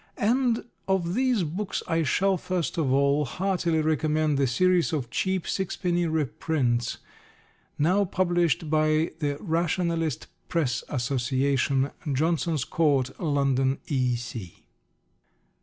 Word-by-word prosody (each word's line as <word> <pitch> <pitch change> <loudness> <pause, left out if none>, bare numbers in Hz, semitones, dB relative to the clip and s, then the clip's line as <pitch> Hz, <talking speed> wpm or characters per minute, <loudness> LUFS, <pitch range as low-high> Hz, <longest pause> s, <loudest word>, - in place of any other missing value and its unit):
And 240 +2 +1 0.2
of 180 -3 0
these 250 -3 +2
books 180 +6 -3
I 165 0 +1
shall, 190 +6 +2
first 175 -3 -2
of 140 -5 +1
all, 140 +2 +3
heartily 175 +2 0
recommend 155 -1 +1
the 135 - +3
series 180 +6 +2
of 130 -6 -2
cheap 190 -2 -1
sixpenny 175 -2 -1
reprints 140 -5 -1 0.8
now 185 +7 +3
published 175 -6 +1
by 155 +1 +2
the 145 -3 -1
Rationalist 165 - -1 0.2
Press 140 -8 0
Association, 135 +1 0 0.2
Johnson's 160 0 0
Court, 140 -5 +1
London, 140 -4 +1
E. 125 -4 +1
155 Hz, 110 wpm, -26 LUFS, 140-175 Hz, 0.8 s, all